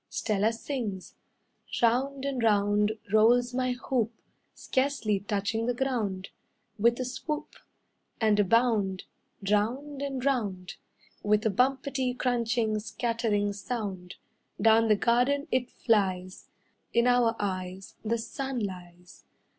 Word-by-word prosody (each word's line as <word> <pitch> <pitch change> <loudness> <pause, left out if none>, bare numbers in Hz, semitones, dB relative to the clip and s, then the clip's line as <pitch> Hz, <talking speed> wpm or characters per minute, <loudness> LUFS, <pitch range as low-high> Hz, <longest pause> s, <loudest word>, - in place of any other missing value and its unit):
Stella 215 0 +1
sings: 225 -5 -5 0.7
"Round 265 +4 +1
and 270 -3 -2
round, 210 -1 +3 0.2
rolls 240 +3 +4
my 255 0 0
hoop, 245 -2 -1 0.4
Scarcely 260 -7 0
touching 205 +3 -2
the 245 - 0
ground, 220 -8 -2 0.5
With 235 +3 +3
a 255 - -1
swoop, 280 +4 -4 0.7
And 215 -2 +3
a - - +6
bound, 205 -3 +2 0.4
Round 255 +8 0
and 270 -2 -3
round. 200 -10 -1 0.4
With 210 +1 +2
a 220 - +3
bumpety, 265 +2 0
crunching, 235 -3 0
scattering 220 -2 -1
sound, 200 -4 -5 0.4
Down 225 +1 +5
the 215 - +5
garden 250 +7 +2
it 255 -1 +1
flies; 185 -5 0 0.5
In 235 0 +4
our 245 -2 +3
eyes 185 -1 -4
The 230 +1 0
sun 265 +3 -4
lies. 180 -4 -7
230 Hz, 115 wpm, -28 LUFS, 205-250 Hz, 0.7 s, a